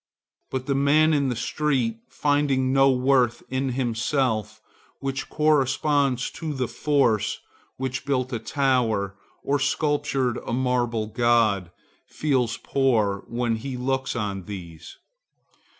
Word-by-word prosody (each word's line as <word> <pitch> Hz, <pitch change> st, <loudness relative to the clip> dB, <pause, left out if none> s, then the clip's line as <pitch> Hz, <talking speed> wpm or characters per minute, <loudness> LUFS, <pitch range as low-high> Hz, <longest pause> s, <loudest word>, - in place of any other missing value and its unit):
But 130 Hz, -1 st, -3 dB
the 140 Hz, -, 0 dB
man 150 Hz, +3 st, +4 dB
in 140 Hz, -3 st, +2 dB
the 125 Hz, -, -1 dB
street, 125 Hz, -3 st, -1 dB
finding 140 Hz, -3 st, +1 dB
no 135 Hz, 0 st, +5 dB
worth 130 Hz, -2 st, +2 dB
in 130 Hz, 0 st, -1 dB
himself 115 Hz, -3 st, -1 dB, 0.4 s
which 135 Hz, -1 st, -4 dB
corresponds 145 Hz, -3 st, +2 dB
to 155 Hz, -3 st, -5 dB
the 130 Hz, -2 st, -1 dB
force 115 Hz, -8 st, +1 dB, 0.4 s
which 130 Hz, 0 st, -3 dB
built 130 Hz, -2 st, -1 dB
a 115 Hz, -, -1 dB
tower 115 Hz, -9 st, 0 dB, 0.3 s
or 145 Hz, +1 st, +1 dB
sculptured 135 Hz, -3 st, 0 dB
a -, -, -4 dB
marble 120 Hz, -3 st, 0 dB
god, 110 Hz, -4 st, +2 dB, 0.4 s
feels 130 Hz, -6 st, 0 dB
poor 110 Hz, -8 st, +1 dB
when 115 Hz, -1 st, -1 dB
he 125 Hz, +3 st, -5 dB
looks 130 Hz, +1 st, -1 dB
on 100 Hz, -5 st, -3 dB
these. 85 Hz, -5 st, -9 dB
130 Hz, 120 wpm, -24 LUFS, 115-140 Hz, 0.4 s, no